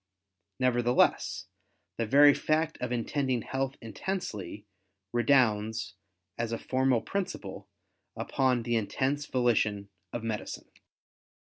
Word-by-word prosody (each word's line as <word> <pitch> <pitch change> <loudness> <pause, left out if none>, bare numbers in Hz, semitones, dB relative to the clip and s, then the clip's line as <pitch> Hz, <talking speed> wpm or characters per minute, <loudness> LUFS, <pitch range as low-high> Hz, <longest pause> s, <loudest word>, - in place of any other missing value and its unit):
Nevertheless 120 -1 +2 0.5
the 115 - -1
very 145 +4 +7
fact 155 +2 0
of 125 -1 -2
intending 125 0 0
health 135 +1 -2
intensely, 105 - -5 0.5
redounds, 110 -3 +2 0.5
as 115 -1 -1
a 115 - -1
formal 130 -2 +1
principle, 190 - -4 0.5
upon 130 -3 +1
the 120 0 0
intense 135 +7 -1
volition 110 -5 +1 0.2
of 120 - -4
medicine. 110 -2 -5
120 Hz, 100 wpm, -29 LUFS, 110-135 Hz, 0.5 s, very